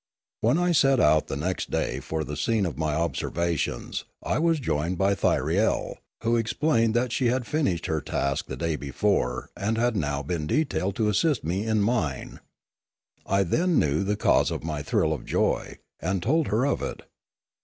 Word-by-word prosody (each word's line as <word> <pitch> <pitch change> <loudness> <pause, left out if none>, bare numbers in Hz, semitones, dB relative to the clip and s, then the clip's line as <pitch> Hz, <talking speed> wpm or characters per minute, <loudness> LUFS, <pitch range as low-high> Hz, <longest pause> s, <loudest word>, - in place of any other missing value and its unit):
When 120 +7 +2
I 175 0 +2
set 135 -5 +4
out 75 +1 +3
next 85 +7 -2
day 65 - -1
for 80 +3 -3
the 75 +1 -5
scene 105 +8 +1
of 80 -6 -3
my 75 0 -1
observations, 85 -3 -2 0.2
I - - 0
was 165 -1 +2
joined 85 - -1
by 95 +3 +3
Thyriel, 100 - +1 0.3
who 115 +1 +2
explained 115 0 +1
that 120 0 +1
she 125 +1 +1
had 125 +1 0
finished 140 - 0
her 80 -1 -1
task 70 +1 -2
the - - -6
day 85 -2 -1
before 70 -4 -1
and 110 +3 -1
had 120 0 +1
now 70 -6 -1
been 75 +1 -3
detailed 100 - 0
to 110 -2 +1
assist 145 +8 +1
me 95 +7 -2
in 110 -1 +2
mine. 95 - -1 0.9
I 100 0 +3
then 170 - +1
knew 75 +3 +2
the 105 +1 -1
cause - - +3
of - - -4
my 75 -2 -3
thrill 80 +2 +1
of 75 - -5
joy, - - -1 0.2
and 90 +1 -1
told 155 - +2
her 115 +5 +1
of 140 - 0
it. - - -5
95 Hz, 180 wpm, -26 LUFS, 80-120 Hz, 0.9 s, set